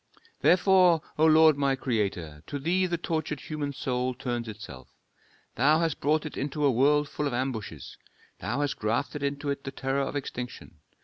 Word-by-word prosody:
"Therefore, 180 -2 +5 0.2
O 160 - +6
Lord, 155 -1 +6
my 140 -1 +2
Creator, 100 - -2
to 145 - -4
Thee 180 +6 +1
the 170 -1 -1
tortured 160 -3 -2
human 150 -2 -4
soul 125 -1 -2
turns 120 -2 -3
itself. 110 0 -9 0.7
Thou 145 +6 +5
hast 165 -2 -1
brought 155 +2 +1
it 150 - -6
into 145 +2 -2
a 140 - +5
world 145 +4 +3
full 145 0 -3
of 130 - -2
ambushes, 115 - -4 0.4
Thou 120 +9 -2
hast 145 -2 -1
grafted 115 +7 -1
into 140 +1 -2
it 140 0 -4
the - - -4
terror 135 +1 -2
of 135 - -3
extinction. 125 - -6
140 Hz, 175 wpm, -27 LUFS, 125-155 Hz, 0.7 s, O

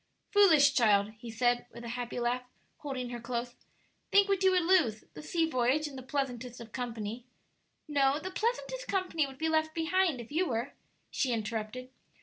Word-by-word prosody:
"Foolish 315 -9 +6
child!" 210 -4 +3
he 235 - -8
said, 240 +2 +1
with 235 +1 -10
a 235 - -6
happy 245 0 -4
laugh, 240 +1 0 0.4
holding 255 -4 -4
her 240 - -5
close; 240 0 -4 0.6
"think 400 0 +6
what 395 -1 +1
you 380 - +6
would 365 -2 +3
lose: 330 - +3
the - - -9
sea 325 +2 0
voyage 260 +2 +1
in 285 - -9
the 260 - -6
pleasantest 255 -3 -3
of 230 -2 -10
company 235 -1 -5 0.3
" - - -45 0.3
"No; 280 -2 +2
the 375 +4 -6
pleasantest - - -2
company 365 -6 0
would 265 -1 -11
be 320 +3 -1
left 315 0 +1
behind 335 -3 +1
if 235 +3 -9
you 350 +4 +1
were," 240 +1 -2 0.4
she 265 - 0
interrupted. 225 +3 -3
260 Hz, 185 wpm, -31 LUFS, 240-320 Hz, 0.6 s, Foolish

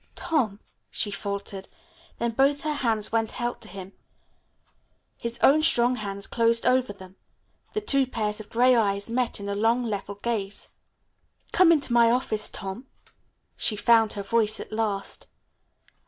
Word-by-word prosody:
"Tom," 260 - -1 0.3
she 205 - -2
faltered. 200 -1 -5 0.5
Then 235 0 -1
both 275 +4 +2
her 305 0 -1
hands 225 -7 -1
went 225 +1 -1
out 240 0 -3
to - - -9
him. 190 0 -9 1.3
His 235 0 -5
own 300 +3 +6
strong 250 -5 +4
hands 200 -2 -5
closed 230 0 +1
over 255 -2 +2
them. 190 -2 -13 0.6
The 430 - -1
two 275 -9 +2
pairs 215 -4 -3
of 215 - -10
gray 250 +2 +4
eyes 200 -1 0
met 245 -2 -1
in 200 - -6
a 200 - -2
long 225 +4 +1
level 205 -3 -4
gaze. 205 -2 -4 0.8
"Come 365 -3 +5
into 285 -6 +1
my 235 -1 +5
office, 220 -3 0
Tom." 195 +7 -6 0.7
She 215 - 0
found 225 0 +4
her 200 - -5
voice 215 +1 +1
at - - -8
last. 210 -3 -2
225 Hz, 155 wpm, -26 LUFS, 205-245 Hz, 1.3 s, own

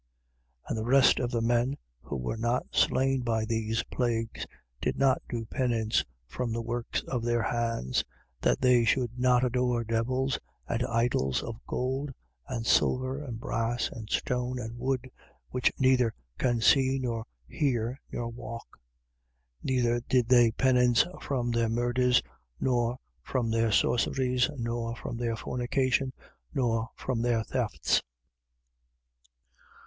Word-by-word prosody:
9:20. - - -17
And - - -1
the 110 - -3
rest 135 0 +6
of 125 -2 0
the 115 -2 -1
men, 120 +3 +1 0.2
who 70 - -5
were 65 - -3
not 120 +2 0
slain 135 0 +2
by 115 -2 0
these 115 0 -1
plagues, 115 -2 -2 0.3
did - - -1
not 135 -1 +3
do 115 -2 -3
penance 115 -3 0 0.2
from 115 - -3
the 115 +1 -1
works 120 +1 -2
of 125 -3 -3
their 120 -1 +1
hands, 115 - 0 0.4
that - - +2
they 125 -2 +5
should 120 +1 +2
not 125 0 +4
adore 125 -1 +1
devils 130 +4 0 0.3
and 115 - -1
idols 115 - +1
of 115 +1 -7
gold 130 +3 -2 0.4
and 115 -3 -3
silver 130 +3 +2
and 120 -6 -6
brass 115 0 -1
and 110 -3 -9
stone 125 0 -1
and 115 -1 -5
wood, 130 +1 -1 0.4
which 125 0 +2
neither 130 -4 +3 0.2
can 120 -3 +1
see 135 +3 +4
nor 120 -4 -2 0.2
hear 125 -2 -1
nor 120 - -3
walk: 115 - -8 0.8
9:21. - - -12
Neither 120 -2 +2
did 125 -2 +3
they 120 -2 +7
penance 125 0 +4 0.2
from 125 -4 -1
their 115 -1 +1
murders 120 - +2 0.4
nor 120 -1 +1 0.2
from 115 - -1
their 115 0 +2
sorceries 125 +3 +2
nor 115 -1 -2
from 120 - -6
their 115 -1 -1
fornication 130 +2 0 0.4
nor 115 -2 +1
from 125 -3 -2
their 120 -2 +1
thefts. 120 -2 0
120 Hz, 140 wpm, -29 LUFS, 115-125 Hz, 0.8 s, they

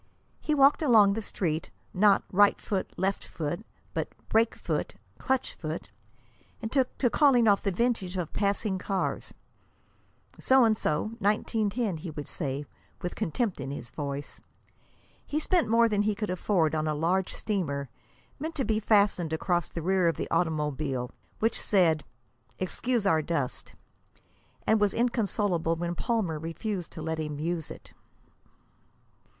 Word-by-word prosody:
He 305 - 0
walked 275 +2 +5
along 220 -9 +6
the 225 - -2
Street, 165 -6 -2 0.2
not 200 +1 +4
"right 205 +2 +5
foot, 195 -2 -2
left 195 +2 -1
foot," 170 +5 -4 0.3
but - - -1 0.2
"brake 225 +1 +3
foot, - - -3 0.2
clutch 265 -1 0
foot," 155 0 -6 0.7
and 220 - -5
took 265 -3 +1
to 255 - +3
calling 255 -6 +5
off 200 -1 +5
the 200 - 0
vintage 195 -3 0
of 170 -3 -3
passing 200 -1 0
cars. 195 0 -2 1.1
"So 260 -1 +5
and 220 -1 +4
So 180 +2 -1
1910," 210 0 0
he 160 +2 -7
would 150 -2 -6
say, 140 -2 -3 0.4
with 175 - -2
contempt 205 - -1
in 135 - -4
his 130 -4 -6
voice. 140 -1 -5 0.8
He 295 - -3
spent 325 -3 +2
more 230 +1 +5
than 210 -2 +1
he 210 0 +1
could 210 -2 -3
afford 180 -4 +1
on 155 0 0
a 155 - 0
large 180 +5 +1
streamer, 150 -10 -2 0.5
meant 320 +3 -4
to 270 - 0
be 220 -1 +1
fastened 200 -6 +3
across 175 +1 0
the 165 - -5
rear 185 0 +3
of 165 - +1
the - - -3
automobile, 150 -6 -1 0.3
which 225 +1 +1
said, 165 -7 +3 0.5
"Excuse 230 +4 -1
our 160 -5 +4
dust," 145 -5 -3 0.9
and 220 - +4
was 205 -2 +2
inconsolable 205 -8 +1
when 170 +1 -2
Palmer 180 -5 -1
refused 170 +3 -4
to 160 - -7
let 160 0 -2
him 150 -2 -3
use 165 0 -2
it. - - -11
190 Hz, 150 wpm, -28 LUFS, 160-220 Hz, 1.1 s, along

